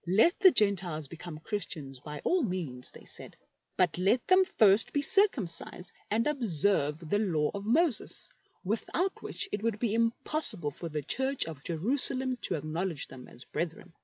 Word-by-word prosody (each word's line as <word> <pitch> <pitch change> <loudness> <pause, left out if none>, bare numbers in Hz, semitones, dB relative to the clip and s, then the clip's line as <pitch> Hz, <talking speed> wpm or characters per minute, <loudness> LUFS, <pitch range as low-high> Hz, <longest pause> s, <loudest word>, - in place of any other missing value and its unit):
Let 215 - +3
the 385 -1 +8
GentEes 180 - 0
become 170 -1 -9
Christians 155 - -5
by 150 +1 -8
all 365 0 +2
means, 170 - -4
they - - -13
said, - - 0 0.4
but 180 -2 +1
let 205 +7 +2
them 375 0 +5
first 210 -1 +5
be 285 - +1
circumcised 195 - +2 0.2
and 225 +2 +1
observe 175 - 0
the 205 +6 +1
Law 165 -8 0
of 200 0 -6
Moses, 300 +2 +1 0.3
without 255 - -2
which - - -4
it 205 - -3
would 225 -2 -1
be 215 -1 -1
impossible 230 - +1
for 165 +4 -7
the 150 -1 -4
Church 265 - +1
of 155 -4 -9
Jerusalem 255 - +2
to - - -2
acknowledge 160 +1 -3
them 125 -1 -11
as 120 - -11
brethren. 170 +1 -5
195 Hz, 160 wpm, -29 LUFS, 160-245 Hz, 0.4 s, the